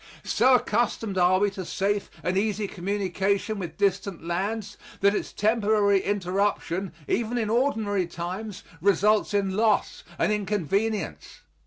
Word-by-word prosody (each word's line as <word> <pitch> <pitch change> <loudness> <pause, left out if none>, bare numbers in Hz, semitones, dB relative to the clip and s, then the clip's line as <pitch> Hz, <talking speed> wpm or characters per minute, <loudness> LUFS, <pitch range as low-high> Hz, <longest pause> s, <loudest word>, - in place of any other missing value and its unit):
So 260 0 +4
accustomed 220 -3 0
are 180 +1 +5
we 205 +1 +2
to 195 -1 -6
safe 200 +3 -1
and 180 - 0
easy 210 +1 0
communication 200 +2 -1
with 175 -3 -6
distant 195 -4 -1
lands 200 +4 -2 0.3
that 200 +1 +4
its - - -3
temporary 210 -2 +2
interruption, 195 -1 -1 0.2
even 235 +1 0
in 220 -2 -1
ordinary 220 -7 +1
times, 185 +4 -6 0.2
results 205 +3 +3
in 195 -2 0
loss 215 0 +1
and 170 - +1
inconvenience. 205 +1 -2
200 Hz, 130 wpm, -26 LUFS, 190-215 Hz, 0.3 s, are